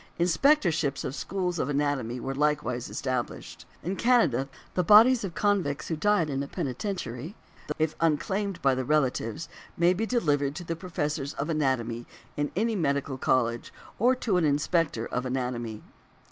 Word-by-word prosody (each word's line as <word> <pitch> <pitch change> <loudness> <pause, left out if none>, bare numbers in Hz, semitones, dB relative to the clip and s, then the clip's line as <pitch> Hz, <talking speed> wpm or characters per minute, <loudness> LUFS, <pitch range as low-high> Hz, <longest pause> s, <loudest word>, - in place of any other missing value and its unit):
Inspectorships 170 - +2
of 130 - -3
schools 180 +1 -2
of 140 - -1
anatomy 140 -4 -1
were 135 +3 -3
likewise 145 -4 0
established. 130 -2 -4 0.2
In 180 +5 -2
Canada, 175 - +3 0.2
the 180 - +1
bodies 225 +6 +7
of 180 -4 -5
convicts 195 -9 0
who 165 - 0
die 205 +2 +2
in 140 -3 -2
a 140 - -4
penitentiary, 150 - -4 0.4
if 155 0 0
unclaimed 190 +5 0
by 135 -1 +4
the 130 0 -1
relatives, 135 -1 0 0.3
may 170 +2 +4
be 220 +5 -2
delivered 145 - +1
to 175 - -6
the 165 -1 -3
professors 150 -5 -3
of 150 +3 -2
anatomy 120 -6 -1 0.3
in 145 0 -1
any 225 +4 +1
medical 140 -5 -1
college, 120 -3 +1 0.3
or 250 +4 +4
to 220 -7 0
an 175 - +2
inspector 150 -4 +1
of 125 - -3
anatomy. 125 -4 -3
150 Hz, 155 wpm, -27 LUFS, 130-180 Hz, 0.4 s, bodies